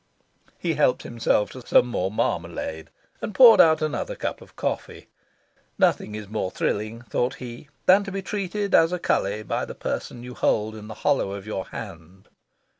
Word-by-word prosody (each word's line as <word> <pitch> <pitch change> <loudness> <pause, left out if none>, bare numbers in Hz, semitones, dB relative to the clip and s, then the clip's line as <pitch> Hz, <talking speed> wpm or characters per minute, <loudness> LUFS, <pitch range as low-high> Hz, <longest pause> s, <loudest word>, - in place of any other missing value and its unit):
He 170 -2 -1
helped 145 -4 +2
himself 115 -3 0
to 130 - -9
some 120 - +4
more 95 -6 -1
marmalade, 80 -5 -3 0.3
and 215 - -5
poured 240 -4 +9
out 160 -1 +4
another 155 - -2
cup - - -4
of - - -16
coffee. - - -4 0.7
Nothing 105 - +2
is 105 -1 -7
more 105 -2 -2
thrilling, 110 +5 -2
thought 125 +1 -1
he, 125 +3 -9 0.2
than 195 +2 +6
to 195 - -5
be 195 0 -4
treated 200 +1 -3
as 165 +1 +6
a 180 - 0
cully 105 - 0
by - - -2
the - - -7
person 120 - -4
you 125 0 -8
hold 110 -2 +1
in 105 -1 -9
the 110 - -8
hollow 100 - +2
of 100 -1 -7
your 100 -3 -4
hand. 85 +4 -10
120 Hz, 180 wpm, -24 LUFS, 105-165 Hz, 0.7 s, poured